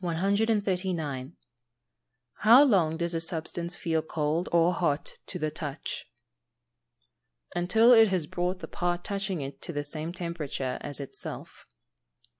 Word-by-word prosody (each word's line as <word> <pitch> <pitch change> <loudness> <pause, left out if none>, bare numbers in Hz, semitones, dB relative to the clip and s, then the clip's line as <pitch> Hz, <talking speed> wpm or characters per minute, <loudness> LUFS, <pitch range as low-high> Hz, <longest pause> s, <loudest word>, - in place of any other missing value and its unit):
139. 180 - 0 1.1
How 235 +6 +8
long 175 - +3
does 170 0 -1
a 165 - -1
substance 170 +1 -3
feel 160 -1 0
cold 155 +2 -1
or 170 +1 +4
hot 150 -5 -1
to 180 - -3
the 155 -2 -2
touch? 150 -2 -5 1.5
Until 220 +7 +4
it 225 -2 +8
has 185 -5 0
brought 180 +2 -2
the - - -6
part 175 0 -2
touching 195 -4 -2
it 135 0 -7
to - - -6
the 145 -2 -2
same 155 +3 -4
temperature 160 -7 -4
as 145 -1 -3
itself. 140 - -8
170 Hz, 130 wpm, -28 LUFS, 155-185 Hz, 1.5 s, How